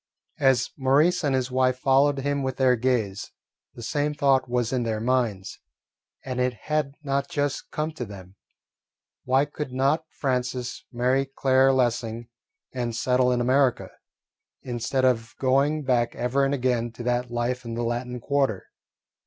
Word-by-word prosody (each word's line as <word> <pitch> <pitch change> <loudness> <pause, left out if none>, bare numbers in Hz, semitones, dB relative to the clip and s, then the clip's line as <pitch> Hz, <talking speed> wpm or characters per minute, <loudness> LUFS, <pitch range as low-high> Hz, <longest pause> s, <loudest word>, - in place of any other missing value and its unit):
As 130 -3 +3
Maurice 150 +7 +3
and 140 -3 +1
his 130 0 -1
wife 130 0 +2
followed 135 +2 +3
him 140 +1 -1
with 130 -1 -3
their 130 -2 +4
gaze, 115 -5 -1 0.4
the 120 - -9
same 150 +4 -1
thought 135 -3 +2
was 120 0 0
in 130 - +1
their 110 -2 -1
minds, 115 -5 -1 0.7
and 130 -1 -3
it 125 0 +1
had 150 -2 -1
not 140 0 -1
just 145 -1 -2
come 155 +1 -2
to 155 -5 -6
them, 95 -2 -12 0.9
Why 130 +2 +3
could 150 -2 -6
not 140 +5 +1
Francis 125 -2 -3
marry 130 +2 +1
Claire 135 0 +3
Lessing 120 -2 -1 0.4
and 120 -3 -3
settle 125 +1 +2
in 125 -1 +1
America, 130 +1 +2 0.7
instead 125 +2 -1
of 115 -3 0
going 140 +3 +2
back 120 -3 +1
ever 130 +3 0
and 135 - 0
again 125 -3 0
to 120 - -8
that 125 0 0
life 120 +1 -2
in 115 -1 -5
the 120 - -2
Latin 120 +1 -3
Quarter? 135 -6 0
130 Hz, 155 wpm, -25 LUFS, 120-135 Hz, 0.9 s, their